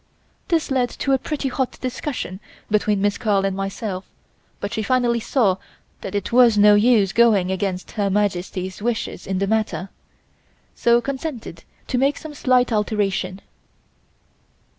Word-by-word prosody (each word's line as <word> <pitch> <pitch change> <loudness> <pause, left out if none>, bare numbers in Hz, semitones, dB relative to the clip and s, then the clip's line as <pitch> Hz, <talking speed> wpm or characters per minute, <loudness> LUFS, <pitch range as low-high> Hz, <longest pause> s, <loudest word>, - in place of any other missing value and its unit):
This 330 -5 0
led 250 -2 +2
to 275 - -3
a 265 - +3
pretty 295 0 -3
hot 260 0 -2
discussion 255 - -4 0.3
between 210 -1 +2
Miss 205 0 +1
Carl 200 -4 +1
and 195 -1 -1
myself 195 0 -4 0.6
but 200 +2 -4
she 220 - -1
finally 240 +1 +1
saw 220 -5 +1 0.4
that - - -6
it 200 - -2
was 235 -3 +5
no 210 0 +7
use 205 -2 +4
going 210 -6 +4
against 190 -1 -3
Her 205 -2 -1
Majesty's 190 -1 -2
wishes 235 0 -3
in 190 0 -1
the 195 - +1
matter, 195 -4 -1 0.8
so 235 0 +3
consented 265 - -5 0.2
to 250 - -1
make 275 +2 +2
some 310 -1 -8
slight 250 -3 +2
alteration. 205 -3 -1
215 Hz, 145 wpm, -22 LUFS, 195-250 Hz, 0.8 s, no